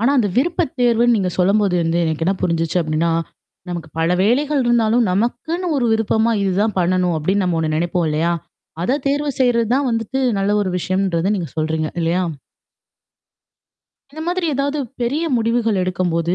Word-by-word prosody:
ஆனா 240 +5 +3
அந்த 210 -5 +2
விருப்ப 330 +7 +1 0.2
தேர்வுன்னு 240 0 +4
நீங்க 185 -3 0
சொல்லும்போது 195 0 +2
வந்து 165 +1 0
எனக்கு 160 0 -2
என்ன 195 - +2
புரிஞ்சுச்சு 165 0 0
அப்படின்னா, 155 +2 0 0.6
நமக்கு 170 -3 -5
பல 165 +1 +1
வேலைகள் 275 +5 +2
இருந்தாலும் 235 0 +3
நமக்குன்னு 245 - -1
ஒரு 245 - +1
விருப்பமா 220 +1 +1
இதுதான் 200 +2 0
பண்ணணும் 180 -1 +1
அப்டின்னு 190 +6 0
நம்ம 175 -2 0
ஒண்ணு 155 -1 -1
நினைப்போம் 170 +1 0
இல்லையா? 160 +3 +1 0.5
அத 270 +7 +1
தேர்வு 285 +1 0
செய்றது 235 -3 +2
தான் 275 -1 +1
வந்துட்டு 230 +3 -2 0.2
நல்ல 195 +1 0
ஒரு 185 - -2
விஷயம்ன்றத 185 0 0
நீங்க 175 -5 -4
சொல்றீங்க. 155 0 -1
இல்லையா? 170 +3 +1 1.9
இந்த 315 +2 -9
மாதிரி 355 0 -1
ஏதாவது 280 +2 -1 0.2
பெரிய 280 +8 0
முடிவுகள் 230 -3 +1
எடுக்கும்போது. 175 -2 0
200 Hz, 155 wpm, -19 LUFS, 170-240 Hz, 1.9 s, தேர்வுன்னு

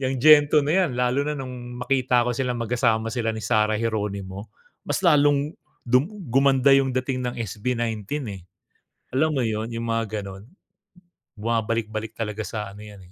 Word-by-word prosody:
'yang 130 0 -1
"Gento" 150 +1 +7
na 150 - 0
'yan. 165 - -2
Lalo 125 +2 +1
na 150 0 -2
no'ng 125 -2 -7
makita 130 -3 +2
ko 125 - +1
silang 125 -1 -1
magkasama 115 -1 0
sila 120 -3 -1
ni 110 - -5
Sarah 110 0 +2
Geronimo, 100 -3 -3 0.4
mas - - 0
lalong 145 -2 +4 0.3
du 125 +1 +4 0.3
gumanda 135 +1 +4
'yong 135 -1 +3
dating 130 0 -1
ng 120 - -5
SB19, 115 +4 -3
eh. 95 -2 -9 0.7
Alam 155 0 +2
mo - - +1
'yon, 110 +1 -3
'yong 115 0 -4
mga 115 -2 -1
gano'n. 95 0 -9 0.9
Bumabalik-balik 110 0 -2
talaga 105 -1 -4
sa 105 -3 -5
ano 100 - -12
'yan, 105 -2 -12
120 Hz, 160 wpm, -24 LUFS, 110-135 Hz, 0.9 s, Gento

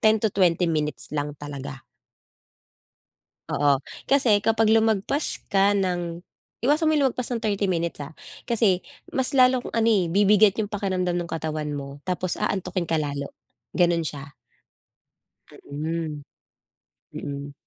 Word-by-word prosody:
10 220 0 +5
to 220 -1 0
20 180 -2 +3
minutes 150 -3 -1
lang 145 0 -3
talaga. 140 -2 -7 1.7
Oo. 140 -1 +2 0.2
Kasi 260 -7 +4
kapag 225 +1 +2
lumagpas 220 +5 +1
ka 200 +1 +4
ng 175 -3 -1 0.4
iwasan 300 +6 +3
mo 315 - +4
yung 280 -3 +3
lumagpas 250 0 -3
ng 230 - -4
30 205 -2 0
minutes 170 -3 -1
ha. 145 +2 -8 0.3
Kasi 220 -6 +2 0.3
mas 260 +1 -1
lalong 255 -1 +4
ano, 230 0 +3
eh, 195 -5 +3
bibigat 200 +3 +4
yung 205 - -5
pakiramdam 185 -4 -1
ng 175 - -3
katawan 155 -2 -3
mo 140 0 -6
tapos 180 -1 -1
aantukin 185 -2 -2
ka 160 -1 +1
lalo, 140 -1 -4 0.4
ganon 170 -2 +2
siya. 140 -1 -7 1.4
Mhm. 155 +1 -3 0.9
Mm. 140 0 -6
180 Hz, 130 wpm, -24 LUFS, 150-215 Hz, 1.7 s, 10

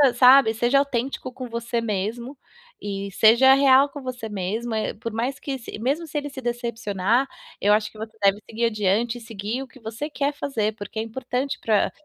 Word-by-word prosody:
sabe, 255 -3 +7
seja 240 +5 +3
autêntico 265 -1 -2
com 255 0 -7
você 235 0 -2
mesmo, 230 +5 -3 0.5
e 200 -1 -4
seja 235 +6 +6
real 275 0 +5
com 285 +1 -9
você 255 -3 -5
mesmo, 215 +4 -3
eh, 220 - -2
por 230 +1 -6
mais 245 +5 -2
que 270 -2 -4
se 230 - -8
mesmo 280 +9 -1
se 300 - -4
ele 290 0 -3
se 270 - -7
decepcionar, 235 -1 0 0.3
eu 205 +1 +4
acho 215 0 +1
que 215 - -16
você 220 0 -8
deve 200 +1 +4
seguir 230 +1 -1
adiante 225 +2 0
e - - -16
seguir 225 +3 -4
o 270 - -7
que 260 - -17
você 230 +6 -5
quer 290 0 -1
fazer, 225 -7 -2
porque 210 +1 -9
é 220 - 0
importante 250 +3 -3
pra, 215 -3 +2
235 Hz, 200 wpm, -24 LUFS, 220-265 Hz, 0.5 s, sabe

